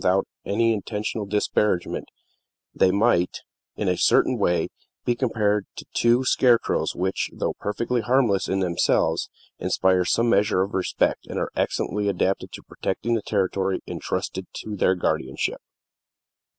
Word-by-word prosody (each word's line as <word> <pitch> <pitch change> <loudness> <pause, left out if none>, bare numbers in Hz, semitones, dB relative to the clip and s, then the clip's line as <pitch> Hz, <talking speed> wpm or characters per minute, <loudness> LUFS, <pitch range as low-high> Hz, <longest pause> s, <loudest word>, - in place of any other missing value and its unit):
Without 95 +1 +2 0.2
any 115 +3 +2
intentional 105 0 -3
disparagement 105 -2 0 0.7
they 95 - +4
might, 100 -2 +2 0.3
in - - -2
a - - +2
certain - - +4
way, 85 -2 +1 0.4
be 120 - +3
compared 105 -5 0
to - - -8
two 120 +2 +3
scarecrows 125 -2 +2
which, 95 +2 -1
though - - -2
perfectly 115 +4 -1
harmless 120 -4 +2
in 95 0 0
themselves, 90 -2 +1 0.3
inspire 95 -1 +2
some 115 +6 +2
measure 105 -3 +3
of 100 - -6
respect, 95 - 0
and - - -5
are - - -2
excellently 105 +1 -1
adapted 95 0 0
to - - -9
protect 95 - -4
the 115 -1 +1
territory 95 -1 0
intrusted - - -4
to 105 - -5
their 95 -1 +2
guardianship. 65 -6 -1
100 Hz, 135 wpm, -24 LUFS, 95-115 Hz, 0.7 s, they